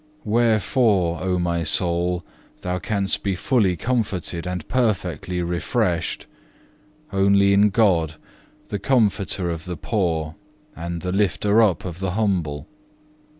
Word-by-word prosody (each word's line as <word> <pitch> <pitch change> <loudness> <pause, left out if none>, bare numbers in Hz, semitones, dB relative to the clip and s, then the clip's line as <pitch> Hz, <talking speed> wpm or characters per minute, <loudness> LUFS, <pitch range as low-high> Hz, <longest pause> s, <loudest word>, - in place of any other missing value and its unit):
Wherefore, 105 - +2
O 90 0 0
my 85 -1 0
soul, 85 +2 +1 0.4
thou 90 0 -2
canst 100 +1 -1
be 100 -2 -1
fully 95 -4 +1
comforted 95 -6 -2
and 90 -3 -4
perfectly 95 -6 -1
refreshed, 85 -1 -1 0.9
only 100 0 +4
in 100 +1 +5
God, 90 -7 +2 0.5
the 100 - -3
Comforter 100 -6 +1
of 80 -1 -6
the 90 -2 -5
poor, 80 -2 -1 0.4
and 85 +1 -5
the 90 - -2
lifter 105 +2 +2
up 95 -7 +2
of 85 -1 -6
the 95 -2 -2
humble. 90 -9 -1
90 Hz, 120 wpm, -22 LUFS, 85-105 Hz, 0.9 s, in